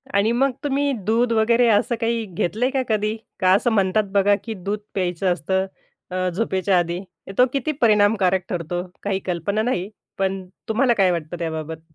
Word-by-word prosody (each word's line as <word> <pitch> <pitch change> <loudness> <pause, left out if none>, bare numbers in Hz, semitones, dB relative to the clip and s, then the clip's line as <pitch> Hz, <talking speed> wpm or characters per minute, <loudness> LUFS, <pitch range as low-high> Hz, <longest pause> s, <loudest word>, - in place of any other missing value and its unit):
आणि 200 +3 +3
मग 265 +3 +2
तुम्ही 285 0 +1
दूध 230 +3 +2
वगैरे, 230 +2 +4
असं 220 +3 +2
काही 230 0 0
घेतलंय 210 +6 -1
का 265 -1 +1
कधी? 215 0 +1 0.2
का 185 -1 +4
असं 220 +5 +2
म्हणतात 205 0 +2
बघा, 200 0 +4
की 225 - -4
दूध 200 +1 -4
प्यायचं 180 -1 0
असतं, 190 +4 -1 0.5
अ, 185 0 0
झोपेच्या 190 0 +1
आधी. 175 +1 -2 0.4
तो 250 - +7
किती 275 +2 0
परिणामकारक 205 -4 +3
ठरतो? 175 0 -2 0.2
काही 200 -1 0
कल्पना 190 +4 -1
नाही, 205 -5 -1 0.3
पण 190 -1 -1 0.2
तुम्हाला 240 +3 +3
काय 195 -5 +3
वाटतं 170 0 -3
त्याबाबत? 160 -1 -4
200 Hz, 165 wpm, -22 LUFS, 180-225 Hz, 0.5 s, तो